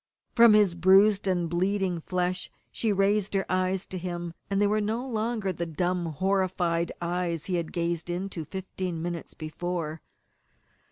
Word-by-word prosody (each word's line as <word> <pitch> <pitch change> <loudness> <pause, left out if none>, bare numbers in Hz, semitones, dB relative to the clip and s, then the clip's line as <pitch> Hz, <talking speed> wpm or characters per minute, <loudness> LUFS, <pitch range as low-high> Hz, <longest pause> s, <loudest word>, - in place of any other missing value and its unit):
From 235 -2 +7
his 205 -4 +5
bruised 195 +3 +5
and 175 -2 +1
bleeding 180 0 0
flesh 180 +1 -1 0.2
she 225 - 0
raised 200 +1 +2
her 195 - +1
eyes 185 +1 0
to 185 - -6
him, 175 -1 -4 0.2
and 195 0 +1
they 205 - +4
were 210 +1 +2
no 225 +5 -2
longer 220 -4 -1
the 170 0 -3
dumb, 175 +2 -1
horrified 175 0 0
eyes 170 -2 -2
he 190 - -3
had 170 -2 -3
gazed 170 0 -2
into 175 -1 -3
fifteen 185 0 -5
minutes 175 -1 -5
before. 160 0 -4
185 Hz, 155 wpm, -27 LUFS, 170-195 Hz, 0.2 s, From